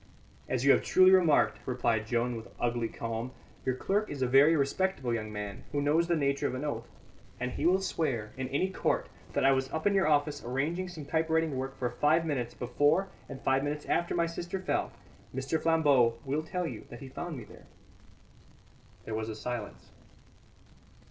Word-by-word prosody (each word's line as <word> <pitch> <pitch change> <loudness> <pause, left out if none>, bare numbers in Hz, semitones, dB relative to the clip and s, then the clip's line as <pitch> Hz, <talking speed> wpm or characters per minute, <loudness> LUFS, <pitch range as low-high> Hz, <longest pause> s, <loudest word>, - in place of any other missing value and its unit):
"As 130 0 0
you 140 - +8
have - - +5
truly 185 0 +5
remarked," 175 -6 +4
replied 115 -4 0
Joan, 120 +1 0
with 115 0 -7
ugly 120 -1 0
calm, 115 +3 -4 0.3
"your 130 - +1
clerk 205 +10 0
is 140 -3 -3
a - - +2
very 140 +6 +6
respectable 140 -2 0
young 110 -2 -3
man, 105 -1 -6
who 145 - 0
knows 155 +4 +2
the 175 - +2
nature 140 -2 +1
of - - -3
an 130 +4 -4
oath; 145 - -3 0.5
and 125 +1 -2
he 155 - 0
will 185 +2 +4
swear 130 - -1
in 130 0 -3
any 165 +8 0
court - - 0 0.2
that - - +1
I 135 - +7
was 130 0 +1
up 160 - -3
in 205 - +4
your 195 -3 +3
office 145 -1 +1
arranging 150 +9 -1
some 165 -5 -8
typewriting 160 -1 +1
work 135 +1 -4
for 125 -1 -1
five 155 +6 +2
minutes 125 -6 -2
before 145 +10 +2 0.2
and 135 -2 -7
five 135 +1 +2
minutes 150 +1 -3
after 175 - 0
my 170 -1 +2
sister 170 +2 -4
fell. 185 - -1 0.4
Mr. 135 +4 -1
Flambeau 145 -8 +4
will 140 +3 0
tell 180 +3 -3
you - - -6
that - - -10
he 135 - -7
found 160 +4 -6
me 120 - -7
there." - - -15 1.4
There 110 - -5
was 110 0 -2
a 110 - -4
silence. 115 -1 -6
140 Hz, 195 wpm, -30 LUFS, 125-165 Hz, 1.4 s, you